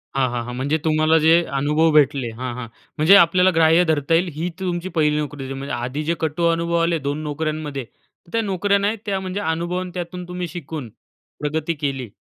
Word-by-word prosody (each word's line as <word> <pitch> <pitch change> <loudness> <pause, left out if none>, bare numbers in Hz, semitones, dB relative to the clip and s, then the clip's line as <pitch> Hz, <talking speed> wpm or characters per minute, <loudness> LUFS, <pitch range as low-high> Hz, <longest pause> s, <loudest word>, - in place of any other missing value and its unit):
हां, 130 -2 +2
हां. 120 -1 -2
हां. 125 - -6
म्हणजे 140 +5 0
तुम्हाला 155 +1 +3
जे 165 +2 +5 0.2
अनुभव 150 +3 +2
भेटले 140 -4 +3
हां, 125 -1 -4
हां. 125 -2 -6 0.3
म्हणजे 160 +6 +6
आपल्याला 180 0 +5
ग्राह्य 165 +2 +5
धरता 155 -1 0
येईल 170 +3 +3
ही 165 +3 -2
तुमची 180 0 -3
पहिली 150 -1 +3
नोकरी 145 -2 -4
होती 135 +1 -5
म्हणजे 135 +1 -5
आधी 125 +5 -3
जे 165 - 0
कटू 160 +2 -1
अनुभव 170 0 -1
आले 165 -1 +1
2 145 +2 -3
नोकऱ्यांमध्ये, 150 -2 -3 0.5
त्या 230 - +1
नोकऱ्या 200 -1 +1
नाही 205 +3 0
त्या 195 -2 -1
म्हणजे 190 +1 -4
अनुभव 170 +1 -1
आणि 185 -1 -5
त्यातून 180 0 -6
तुम्ही 180 0 -4
शिकून, 155 -5 -7 0.5
प्रगती 155 +2 -1
केली. 135 -5 -2
160 Hz, 195 wpm, -21 LUFS, 145-175 Hz, 0.5 s, म्हणजे